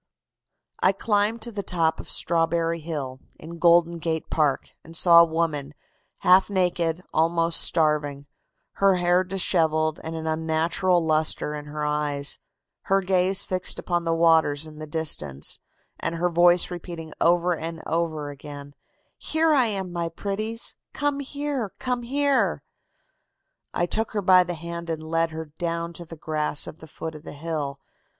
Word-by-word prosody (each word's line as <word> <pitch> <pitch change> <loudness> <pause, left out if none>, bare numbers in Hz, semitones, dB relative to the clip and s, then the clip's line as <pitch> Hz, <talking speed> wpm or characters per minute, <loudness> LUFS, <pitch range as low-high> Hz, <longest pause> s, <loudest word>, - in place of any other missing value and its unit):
"I 190 - +4
climbed 210 +2 0
to 235 - -2
the 205 -2 -4
top 165 -4 0
of - - -8
Strawberry 165 0 +2
Hill, 145 -5 -5 0.2
in 170 +2 -10
Golden 170 0 +4
Gate 160 -1 -3
Park, 150 -4 +1
and 165 +1 -11
saw 170 -2 +8
a - - +6
woman, 160 -3 -2 0.5
half 185 +1 +5
naked, 180 -3 0
almost 165 +1 +2
starving, 150 -3 +3 0.6
her 195 -1 +5
hair 175 +1 +3
dishevelled 160 -4 +1
and 160 0 -5
an 160 0 -5
unnatural 160 +3 +1
lustre 155 -1 +1
in 150 -1 -6
her 150 0 -4
eyes, 150 -1 -1 0.5
her 195 0 +2
gaze 190 +1 +1
fixed 185 -1 -2
upon 175 -1 -1
the 165 0 0
waters 160 -3 +3
in 155 -1 -12
the 155 - -7
distance, 150 - -2 0.4
and 165 - -2
her 175 +2 +1
voice 175 +1 +4
repeating 170 -2 -7
over 175 +1 +3
and 165 0 -6
over 160 -3 -2
again: 145 0 -10 0.5
'Here 315 0 +1
I 260 -5 +4
am, 190 -4 -3
my 170 -1 -2
pretties; 215 +6 -3 0.2
come 290 -1 -1
here, 280 -5 -3
come 250 -1 -2
here.' 280 +3 +1 1.1
"I 175 - 0
took 220 +6 -2
her 210 - 0
by 185 -1 +6
the 175 -1 -4
hand 170 +1 -7
and 160 -1 -3
led 165 0 +2
her 160 0 -6
down 170 0 -2
to 170 +1 -9
the 165 - -10
grass 150 -1 -1
at 155 - -9
the 160 - -12
foot 160 +2 -7
of 155 - -10
the - - -9
hill. 145 -2 -4
165 Hz, 160 wpm, -25 LUFS, 155-185 Hz, 1.1 s, saw